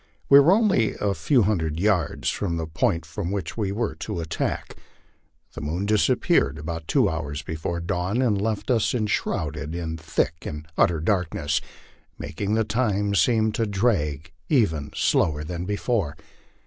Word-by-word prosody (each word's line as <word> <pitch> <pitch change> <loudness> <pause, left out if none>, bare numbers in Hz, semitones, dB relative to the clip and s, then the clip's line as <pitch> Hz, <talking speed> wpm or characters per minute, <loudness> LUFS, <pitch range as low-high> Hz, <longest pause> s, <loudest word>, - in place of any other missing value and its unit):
We 140 - +9
were 145 +5 +6
only 200 - +3
a 100 -1 0
few 120 - +2
hundred 85 -6 0
yards 95 -5 +1
from 85 -5 -2
the 80 - -2
point 80 +1 0
from 80 +2 -4
which 95 -4 -3
we 105 -4 -1
were 110 +2 -1
to - - -4
attack. 80 -2 -3 0.8
The 80 - -7
moon 80 +6 -2
disappeared 100 -8 +2
about 80 +2 -5
two - - +3
hours 75 -2 -3
before 80 +2 -3
dawn, 90 +6 -1
and 110 -6 +2
left 110 +3 -1
us 115 0 +2
enshrouded 80 -8 -2
in 80 -2 -4
thick 80 -1 0
and 75 +1 -7
utter 85 -2 +3
darK 90 -2 0
ness, 75 +1 0 0.6
making 100 +6 -3
the 110 - +2
time 105 -2 0
seem 110 +4 +3
to 110 +1 -1
drag 85 - 0 0.2
even 80 - +2
slower 75 -2 +1
than 85 +3 -5
before. 100 - -1
90 Hz, 160 wpm, -24 LUFS, 80-105 Hz, 0.8 s, We